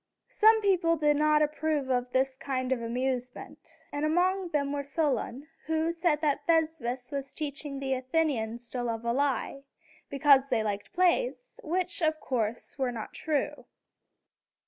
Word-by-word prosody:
Some 440 0 +5
people 355 -4 +3
did 295 -1 +3
not 305 0 +4
approve 300 -2 -1
of 250 0 0
this 260 +1 +1
kind 260 -1 -3
of 255 -2 +1
amusement; 250 +1 -4 0.2
and 290 +1 -2
among 360 +4 +1
them 280 -3 0
was 285 -1 -4
Solon, 285 -3 -1 0.2
who 320 +1 +1
said 335 -3 +1
that 290 -2 0
Thespis 310 -7 0
was 275 -1 -4
teaching 285 -2 -5
the 270 -1 -1
Athenians 255 -4 -1
to 250 - -3
love 230 -1 -3
a 235 - +1
lie, 275 0 -1 0.5
because 275 -1 +5
they 235 -4 +1
liked 205 -1 -2
the - - -31
plays, - - +1
which, 360 +2 -2
of 315 -1 +1
course, 235 +1 -3
were 260 -2 +1
not 225 -3 -7
true. 300 -3 -2
285 Hz, 155 wpm, -29 LUFS, 255-315 Hz, 0.5 s, Some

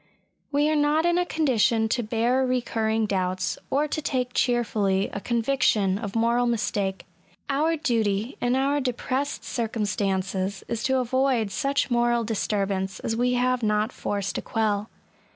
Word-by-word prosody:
We 290 +1 +2
are 310 - +2
not 300 +2 +2
in 345 0 +3
a 360 - 0
condition 235 -7 +2
to 240 - +1
bear 235 +4 +1
recurring 225 -3 0
doubts, 185 -2 -1
or 290 +2 +1
to 310 - -2
take 250 -3 -1
cheerfully 210 -6 +1
a - - -3
conviction 225 -5 +1
of 205 -2 -6
moral 235 +2 +2
mistake. 205 -4 -1 0.5
Our 310 +4 +2
duty, 225 -5 0
in 245 +1 +2
our 280 +2 +1
depressed 260 +2 -2
circumstances, 200 -4 -2
is 230 -1 -3
to 265 0 +2
avoid 255 -3 +1
such 275 +6 0
moral 240 0 +2
disturbance 195 -3 -1
as 225 - -2
we 250 +2 +1
have 250 0 +1
not 210 +1 +1
force 200 -2 -3
to - - -3
quell. 215 -2 -1
235 Hz, 150 wpm, -25 LUFS, 205-260 Hz, 0.5 s, in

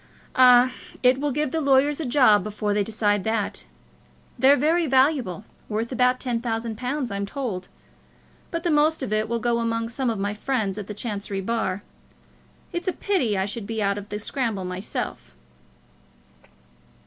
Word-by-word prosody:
"Ah; 250 0 +7 0.3
it 255 +2 +4
will 295 -1 0
give 295 0 -1
the 320 - -1
lawyers 280 +1 +3
a 310 - -2
job 240 -5 +5
before 210 0 -2
they 205 0 +2
decide 205 -2 0
that. 215 - -2 0.7
They're 275 +2 +6
very 325 +4 +2
valuable; 260 - +2 0.2
worth 225 +3 -2
about 250 0 +2
ten 240 -3 -2
thousand 225 -1 -2
pounds, 255 +1 -3
I'm 200 0 -3
told; 200 -7 -4 0.8
but 335 -2 -4
the 345 - +1
most 305 0 +3
of 215 - -2
it 215 0 0
will 235 - 0
go 235 +1 0
among 230 0 -1
some 250 +1 -1
of 225 - -1
my 200 +1 -1
friends 215 -3 -2
at 200 - -7
the 210 - -6
Chancery 205 -3 -3
bar. 205 -2 -2 0.9
It's 345 +2 -3
a 370 - +1
pity 360 - 0
that 190 - +1
I - - -1
should 205 0 -5
be 225 0 -3
out 200 0 0
of 205 - -11
the 210 - -3
scramble 215 -3 -2
myself." 180 - -5
230 Hz, 175 wpm, -24 LUFS, 205-265 Hz, 0.9 s, Ah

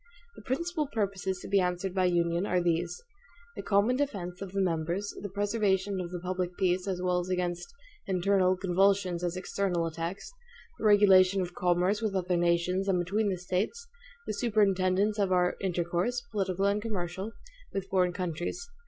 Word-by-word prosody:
The - - -12
principal 305 +6 -2
purposes 195 -6 -2
to - - -8
be 200 - +3
answered 180 +1 -1
by 185 -1 +2
union 170 +1 +1
are 180 - +2
these 175 0 -1 0.5
the - - -5
common 210 +5 +2
defense 195 -11 -3
of 195 -2 -6
the 195 - -2
members; 175 +2 -1
the 205 - -5
preservation 200 -1 0
of 175 - -5
the 180 0 -5
public 180 0 -3
peace 185 0 +1
as 185 -2 -2
well 180 -1 +2
against 180 - -2 0.4
internal 185 0 +2
convulsions 190 -1 +2
as 175 0 -1
external 185 -2 -1
attacks; 165 - -5 0.5
the - - -3
regulation 195 -2 +6
of 175 0 -6
commerce 180 +4 +1
with 215 -3 -1
other 180 -1 0
nations 175 +2 +1
and 190 -2 +2
between 200 +5 0
the 185 - -1
States; 185 - -2 0.4
the - - -3
superintendence 205 -2 +2
of 195 -2 +1
our 180 -1 +2
intercourse, 180 +6 -1
political 195 -2 0
and 200 +1 +2
commercial, 195 -1 -4 0.4
with 195 -1 -3
foreign 185 -2 +2
countries. 180 - -4
185 Hz, 165 wpm, -29 LUFS, 180-200 Hz, 0.5 s, regulation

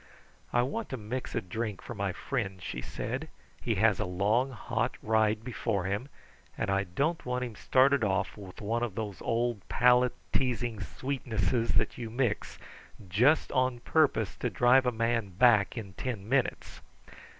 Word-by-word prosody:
"I 120 - +3
want 195 - -3
to 130 - -4
mix 120 +4 -5
a - - +1
drink 105 +2 -4
for - - -8
my 100 -3 -1
friend," 95 -3 -3
she - - -5
said. 130 +9 -4 0.3
"He 115 - 0
has 105 0 +3
a 110 - 0
long, 105 +8 +1
hot 125 - -2
ride 110 0 +2
before 115 -5 -2
him, 100 +8 -2 0.5
and - - -1
I 100 +1 +1
don't 140 - -1
want 125 0 -2
him 120 -3 -5
started 135 +2 +3
off 100 -1 0
with 95 -3 -10
one 115 +3 -1
of 120 -5 -2
those 105 -4 -5
old 115 -2 0
palate 125 0 +4 0.2
teasing 120 -4 0
sweetnesses 115 - -1
that - - +1
you 115 -2 -4
mix 120 -2 -1 0.5
just 125 - +3
on 130 -2 +1
purpose 135 - +2
to 125 - -1
drive 125 +2 +4
a - - +3
man 115 -2 0
back 110 +2 +4
in 100 -4 -6
ten 110 -2 -4
minutes." 130 +1 -1
115 Hz, 165 wpm, -30 LUFS, 105-125 Hz, 0.5 s, palate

